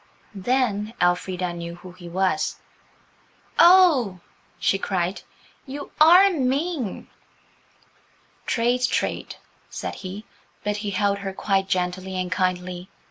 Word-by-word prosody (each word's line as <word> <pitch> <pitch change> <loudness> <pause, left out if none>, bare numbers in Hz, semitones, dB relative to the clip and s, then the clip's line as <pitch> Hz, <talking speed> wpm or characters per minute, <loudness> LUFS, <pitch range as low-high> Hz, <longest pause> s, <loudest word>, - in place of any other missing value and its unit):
Then 215 0 -1
Elfrida 180 0 0
knew 170 0 -6
who 180 +1 -12
he 175 -1 -11
was. 190 +2 0 1.0
"Oh," 335 - +6 0.4
she 195 - +1
cried, 185 -1 -2 0.5
"you 280 +2 -7
are 360 +5 +8
mean!" 275 - -2 1.4
"Trade's 245 +1 +1
trade," - - -2 0.3
said - - -5
he, 195 +3 -8 0.4
but 210 0 -1
he 205 0 -3
held 200 +1 0
her 195 -1 -5
quite 195 0 0
gently 185 +1 -2
and 180 0 -3
kindly. 185 -1 -2
195 Hz, 110 wpm, -24 LUFS, 185-250 Hz, 1.4 s, are